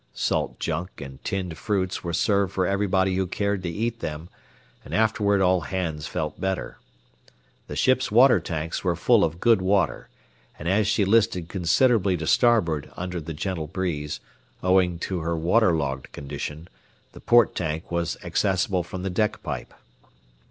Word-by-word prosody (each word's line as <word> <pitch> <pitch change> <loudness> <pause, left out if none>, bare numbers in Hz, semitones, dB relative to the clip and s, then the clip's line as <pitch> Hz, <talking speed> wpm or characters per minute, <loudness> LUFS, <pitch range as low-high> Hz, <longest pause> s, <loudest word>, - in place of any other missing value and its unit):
Salt - - -1
junk 85 +3 -3
and 65 -1 -10
tinned 90 -5 -3
fruits 95 -3 -1
were 85 - -3
served 100 +2 +1
for 95 - +1
everybody 95 0 +1
who 95 -1 0
cared 100 +1 -1
to 90 - -3
eat 115 +6 -2
them, 80 0 -5 0.5
and 75 - -5
afterward 105 -2 +2
all 90 -1 +3
hands 80 -5 -3
felt 75 +3 -4
better. 95 0 -3 0.9
The - - -6
ship's 130 -2 +2
water 125 +4 +6
tanks 80 -1 -4
were 90 -2 +1
full 105 +5 +4
of 80 +1 -1
good 115 -3 +4
water, 95 +1 +1 0.5
and 75 - -6
as 100 +3 +2
she 105 -1 +2
listed 100 -5 +2
considerably 95 +1 +2
to 80 - -4
starboard 85 - +2
under 90 -1 -4
the 80 +1 -6
gentle 80 -1 -3
breeze, 80 -4 -3 0.4
owing 90 -2 +3
to 95 -2 -2
her 85 +1 -2
water 90 +5 +3
logged 70 -3 -3
condition, 75 +3 -6 0.4
the - - -13
port 120 -2 +4
tank 80 +2 -3
was 85 0 -1
accessible 95 +1 +1
from 90 +2 -7
the 95 - -2
deck 105 +3 -1
pipe. 75 -6 -5
90 Hz, 160 wpm, -25 LUFS, 80-100 Hz, 0.9 s, water